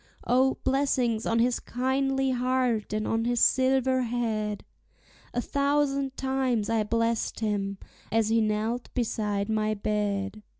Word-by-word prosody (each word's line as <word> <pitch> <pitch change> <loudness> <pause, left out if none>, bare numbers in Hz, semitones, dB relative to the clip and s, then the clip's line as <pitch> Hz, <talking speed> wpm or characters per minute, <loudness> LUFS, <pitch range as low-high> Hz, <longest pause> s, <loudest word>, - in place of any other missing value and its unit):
O, 260 +2 +3
blessings 255 -5 +1
on 230 - +1
his 240 +1 +2
kindly 270 +1 0
heart 250 -3 0
and 215 0 -1
on 225 0 0
his 240 0 +1
silver 260 0 +3
head! 225 -4 -2 0.7
A 245 - -1
thousand 280 -1 0
times 260 -5 0
I 225 -1 +2
blest 230 +1 -1
him, 200 -2 -1 0.3
as 225 -1 +2
he 225 0 +3
knelt 220 +3 -1
beside 210 -4 -1
my 215 -1 0
bed. 205 0 -2
235 Hz, 130 wpm, -27 LUFS, 215-260 Hz, 0.7 s, O